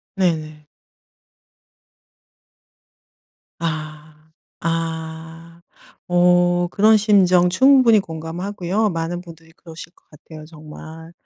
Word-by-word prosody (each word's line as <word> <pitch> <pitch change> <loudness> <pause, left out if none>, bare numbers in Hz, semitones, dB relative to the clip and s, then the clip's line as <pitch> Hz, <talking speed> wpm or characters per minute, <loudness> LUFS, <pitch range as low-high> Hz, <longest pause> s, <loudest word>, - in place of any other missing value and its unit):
네네. 155 -5 -2 2.9
아. 155 -1 -7 0.3
아. 165 0 -6 0.5
어 175 0 +2
그런 215 +2 +4
심정 185 -4 +3
충분히 255 +1 +4
공감하고요. 180 +5 -3
많은 170 0 -4
분들이 165 -2 -15
그러실 165 0 -13
것 - - -32
같아요 155 +1 -14
정말. 160 +1 -12
165 Hz, 165 characters per minute, -20 LUFS, 160-180 Hz, 2.9 s, 그런